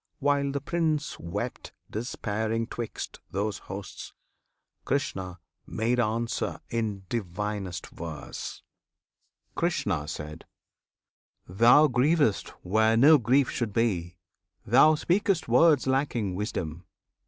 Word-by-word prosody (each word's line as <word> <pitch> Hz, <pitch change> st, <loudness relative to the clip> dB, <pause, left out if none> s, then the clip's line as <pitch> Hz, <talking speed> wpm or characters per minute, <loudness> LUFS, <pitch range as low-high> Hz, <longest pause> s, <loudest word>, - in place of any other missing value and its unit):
) -, -, -51 dB
While 140 Hz, 0 st, +1 dB
the 140 Hz, 0 st, -3 dB
Prince 155 Hz, -1 st, -1 dB
wept 105 Hz, +8 st, -5 dB, 0.2 s
despairing 110 Hz, 0 st, -2 dB
'twixt 120 Hz, 0 st, -6 dB
those 100 Hz, +2 st, -2 dB
hosts, 100 Hz, 0 st, -8 dB, 0.7 s
Krishna 95 Hz, -, -2 dB, 0.3 s
made 120 Hz, +3 st, 0 dB
answer 115 Hz, 0 st, -1 dB
in 110 Hz, -4 st, -2 dB
divinest 100 Hz, -3 st, -3 dB
verse: 80 Hz, -2 st, -7 dB, 0.9 s
Krishna. 75 Hz, 0 st, -1 dB, 1.4 s
Thou 120 Hz, +11 st, +6 dB
grievest 130 Hz, -, +2 dB, 0.2 s
where 110 Hz, +4 st, +3 dB
no 145 Hz, +5 st, +7 dB
grief 125 Hz, +4 st, +3 dB
should 115 Hz, -4 st, -2 dB
be! 90 Hz, -7 st, 0 dB, 0.5 s
thou 135 Hz, +8 st, +6 dB
speak'st 180 Hz, +2 st, +1 dB
Words 140 Hz, +4 st, +5 dB
lacking 130 Hz, -7 st, 0 dB
wisdom! 90 Hz, -4 st, -4 dB
115 Hz, 95 wpm, -27 LUFS, 100-140 Hz, 1.4 s, no